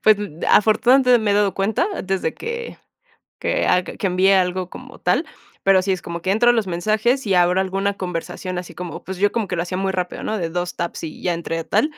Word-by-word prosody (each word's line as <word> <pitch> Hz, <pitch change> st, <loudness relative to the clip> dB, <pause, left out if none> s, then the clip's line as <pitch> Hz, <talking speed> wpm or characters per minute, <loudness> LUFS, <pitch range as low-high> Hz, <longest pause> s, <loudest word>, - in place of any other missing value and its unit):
Pues, 215 Hz, -1 st, +5 dB
mm 175 Hz, -6 st, -7 dB
afortunadamente, 245 Hz, +4 st, +5 dB
me 215 Hz, -2 st, +1 dB
he -, -, +2 dB
dado 205 Hz, -1 st, +2 dB
cuenta 205 Hz, -, +1 dB, 0.2 s
desde 190 Hz, -4 st, -1 dB
que 470 Hz, +1 st, -6 dB, 0.6 s
que -, -, 0 dB
ag 180 Hz, 0 st, +1 dB
que -, -, -1 dB
envié 185 Hz, +2 st, +4 dB
algo 185 Hz, -1 st, +1 dB
como -, -, -11 dB
tal, -, -, +1 dB, 0.4 s
pero 195 Hz, -1 st, +5 dB
sí 190 Hz, +1 st, 0 dB
es 185 Hz, -, -3 dB
como 170 Hz, 0 st, -6 dB
que 190 Hz, -, +1 dB
entro 240 Hz, +4 st, +4 dB
a -, -, +6 dB
los 225 Hz, -4 st, 0 dB
mensajes 215 Hz, +9 st, 0 dB
y 200 Hz, -3 st, +1 dB
abro 180 Hz, +1 st, +4 dB
alguna 195 Hz, +1 st, -1 dB
conversación 180 Hz, 0 st, -4 dB
así 180 Hz, -, -7 dB
como, 180 Hz, -2 st, -7 dB
pues, 190 Hz, -, -6 dB
yo 205 Hz, +2 st, +3 dB
como 225 Hz, -3 st, -1 dB
que 185 Hz, -, -4 dB
lo 170 Hz, -, 0 dB
hacía 180 Hz, +1 st, -4 dB
muy 195 Hz, 0 st, 0 dB
rápido, 180 Hz, -1 st, -3 dB
¿no?, 215 Hz, -, -2 dB
de 165 Hz, -3 st, -2 dB
2 175 Hz, +1 st, -3 dB
taps 170 Hz, 0 st, -4 dB
y 155 Hz, -, -8 dB
ya 175 Hz, -, 0 dB
entré 165 Hz, 0 st, -3 dB
a -, -, -6 dB
tal, 160 Hz, -, +2 dB
190 Hz, 240 wpm, -21 LUFS, 180-215 Hz, 0.6 s, a